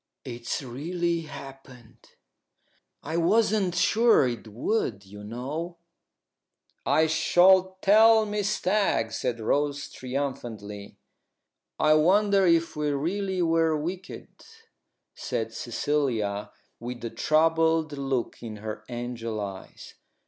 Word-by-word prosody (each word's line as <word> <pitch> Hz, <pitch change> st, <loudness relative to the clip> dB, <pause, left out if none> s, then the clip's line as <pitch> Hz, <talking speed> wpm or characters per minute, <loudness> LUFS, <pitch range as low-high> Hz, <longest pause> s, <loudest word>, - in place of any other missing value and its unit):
"It's 120 Hz, +2 st, -4 dB
really 170 Hz, +7 st, -2 dB
happened. 130 Hz, -5 st, -12 dB, 0.9 s
I 160 Hz, +3 st, -3 dB
wasn't 195 Hz, +1 st, +2 dB
sure 220 Hz, -, +4 dB
it 120 Hz, -2 st, -5 dB
would, 110 Hz, -, -2 dB
you 105 Hz, +2 st, -11 dB
know." 140 Hz, +11 st, -5 dB, 1.1 s
"I 160 Hz, -, +4 dB
shall 185 Hz, +4 st, +4 dB
tell 220 Hz, +2 st, +6 dB
Miss 210 Hz, -1 st, -1 dB
Stagg," 185 Hz, -, +1 dB
said 115 Hz, +1 st, -2 dB
Rose, 145 Hz, +5 st, -1 dB
triumphantly. 120 Hz, -6 st, -5 dB, 0.8 s
"I 155 Hz, -1 st, +4 dB
wonder 195 Hz, +5 st, +4 dB
if 165 Hz, -1 st, +2 dB
we 150 Hz, -1 st, -1 dB
really 180 Hz, +6 st, -1 dB
were 165 Hz, -1 st, +2 dB
wicked," 180 Hz, +5 st, -6 dB, 0.8 s
said -, -, -4 dB
Cecilia, 115 Hz, -9 st, -2 dB, 0.3 s
with 120 Hz, 0 st, -6 dB
a 115 Hz, -, -4 dB
troubled 160 Hz, 0 st, +2 dB
look 135 Hz, -3 st, -3 dB
in 110 Hz, -2 st, -7 dB
her 110 Hz, 0 st, -7 dB
angel 120 Hz, -2 st, -4 dB
eyes. 95 Hz, -2 st, -8 dB
150 Hz, 105 wpm, -26 LUFS, 120-175 Hz, 1.1 s, tell